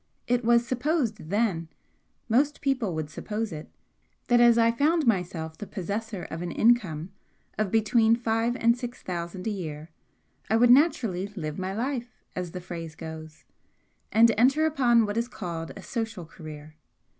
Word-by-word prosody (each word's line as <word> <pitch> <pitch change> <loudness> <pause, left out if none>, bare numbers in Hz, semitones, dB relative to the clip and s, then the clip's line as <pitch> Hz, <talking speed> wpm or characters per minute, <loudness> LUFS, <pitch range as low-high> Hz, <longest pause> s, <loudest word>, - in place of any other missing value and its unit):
It 245 0 +1
was 235 +1 +4
supposed 245 - -1
then 195 -6 0 0.6
most 275 +6 +2
people 255 - 0
would 155 -1 -4
suppose 215 +5 -4
it 155 -1 -7 0.6
that 240 0 +5
as 235 -1 +6
I 230 0 +5
found 300 +6 +2
myself 175 -7 -1
the 210 - -6
possessor 205 +1 -4
of 165 - -5
an 175 - -3
income 190 -8 +2 0.5
of 215 -2 +1
between 225 +1 +4
five 230 0 0
and 235 -1 +3
six 245 0 -7
thousand 175 +1 -5
a 220 - 0
year, 160 -5 -6 0.6
I 220 - +3
would 240 +1 +6
naturally 235 - +3
'live 155 -3 -4
my 190 +1 -3
life,' 245 +1 -4
as 180 -1 -3
the 180 +2 -7
phrase 165 -2 -7
goes, 160 -1 -9 0.7
and 230 +1 +6
enter 275 +6 +4
upon 245 -7 +3
what 205 +1 -3
is 235 +1 0
called 170 -8 -6
a - - -10
social 225 -7 -4
career. 155 -2 -11
220 Hz, 160 wpm, -27 LUFS, 170-240 Hz, 0.7 s, as